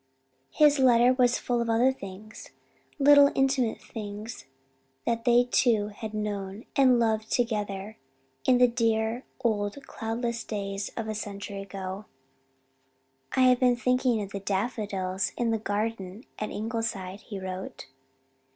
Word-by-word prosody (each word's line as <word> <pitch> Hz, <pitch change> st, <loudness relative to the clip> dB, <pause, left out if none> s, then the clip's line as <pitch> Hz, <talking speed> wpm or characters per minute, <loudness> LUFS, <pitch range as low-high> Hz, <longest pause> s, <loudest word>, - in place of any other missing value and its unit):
His 295 Hz, -, +4 dB
letter 245 Hz, -1 st, +5 dB
was 250 Hz, -1 st, +3 dB
full 240 Hz, -1 st, -1 dB
of 235 Hz, -, -2 dB
other 240 Hz, +4 st, +3 dB
things 205 Hz, -1 st, -10 dB, 0.5 s
little 285 Hz, 0 st, +7 dB
intimate 265 Hz, -4 st, +1 dB
things 210 Hz, -, -8 dB, 0.6 s
that 230 Hz, 0 st, -1 dB
they 240 Hz, 0 st, +5 dB
two 230 Hz, -4 st, +2 dB
had 215 Hz, +1 st, -7 dB
known 205 Hz, 0 st, -4 dB
and 260 Hz, -4 st, +5 dB
loved 220 Hz, -1 st, 0 dB
together 210 Hz, -3 st, -2 dB, 0.5 s
in 255 Hz, -, +6 dB
the 250 Hz, 0 st, +6 dB
dear 230 Hz, 0 st, 0 dB, 0.2 s
old 220 Hz, +4 st, -1 dB
cloudless 235 Hz, +1 st, -3 dB
days 200 Hz, -1 st, -4 dB
of 225 Hz, -2 st, -3 dB
a 215 Hz, -, -2 dB
century 200 Hz, -1 st, -6 dB
ago. 195 Hz, 0 st, -6 dB, 1.3 s
"I've 255 Hz, -1 st, +4 dB
been 250 Hz, -1 st, +4 dB
thinking 250 Hz, -2 st, +1 dB
of 200 Hz, -, -8 dB
the 200 Hz, -, -4 dB
daffodils 195 Hz, -2 st, -2 dB
in 235 Hz, -1 st, +1 dB
the 225 Hz, -, 0 dB
garden 210 Hz, -1 st, -3 dB, 0.2 s
at 215 Hz, -, -3 dB
Ingleside," 210 Hz, -4 st, -4 dB
he 200 Hz, -3 st, -7 dB
wrote. 185 Hz, 0 st, -6 dB
220 Hz, 135 wpm, -27 LUFS, 205-245 Hz, 1.3 s, little